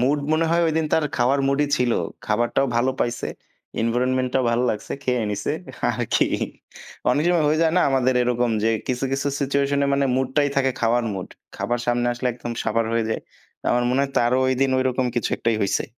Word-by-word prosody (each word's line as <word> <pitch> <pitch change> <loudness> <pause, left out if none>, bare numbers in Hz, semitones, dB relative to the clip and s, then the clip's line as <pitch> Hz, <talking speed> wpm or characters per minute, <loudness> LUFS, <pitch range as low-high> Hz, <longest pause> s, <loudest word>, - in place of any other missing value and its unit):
Mood 140 +4 +2
মনে 160 +1 +2
হয় 170 0 +3
ঐদিন 160 0 0
তার 160 - +3
খাওয়ারার 135 +3 +2
মুডই 140 +2 +2
ছিল। 125 -3 +1 0.3
খাবারটাও 120 +5 +1
ভাল 120 +2 +2
পাইছে। 120 0 -1 0.6
এনভায়রনমেন্টটাও 130 +2 +1
ভালো 120 +1 +1
লাগছে। 105 - -5
খেয়ে 125 -2 +1
নিসে 105 - -2 0.4
আরকি। - - +1 0.9
অনেক 145 +5 +1
সময় 175 -3 +3
হয়ে 155 +2 +2
যায় 160 - +2
না - - +4
আমাদের 130 -1 +2
এরকম 120 0 +1
যে 115 - +3 0.2
কিছু, 125 +1 -1
কিছু 140 +1 0
সিচুয়েশনে 140 0 +1
মানে 140 0 +1
মুডটাই 135 +2 +1
থাকে 135 -1 +3
খাওয়ার 120 +1 +2
মুড। 95 -1 -5 0.3
খাবার 120 0 -1
সামনে 120 0 +1
আসলে 120 +1 -3
একদম 120 0 -6
সাবার 115 +1 +1
হয়ে 115 -1 +1
যায়। - - -1 0.5
আমার 120 - +2
মনে 130 +2 +2
হয় 140 - -2
তারও 120 +2 +2
ঐদিন 130 +1 +1
ঐরকম 130 0 +1
কিছু 120 - 0
একটাই 115 -1 0
হইছে। 100 - 0
130 Hz, 185 wpm, -23 LUFS, 120-140 Hz, 0.9 s, না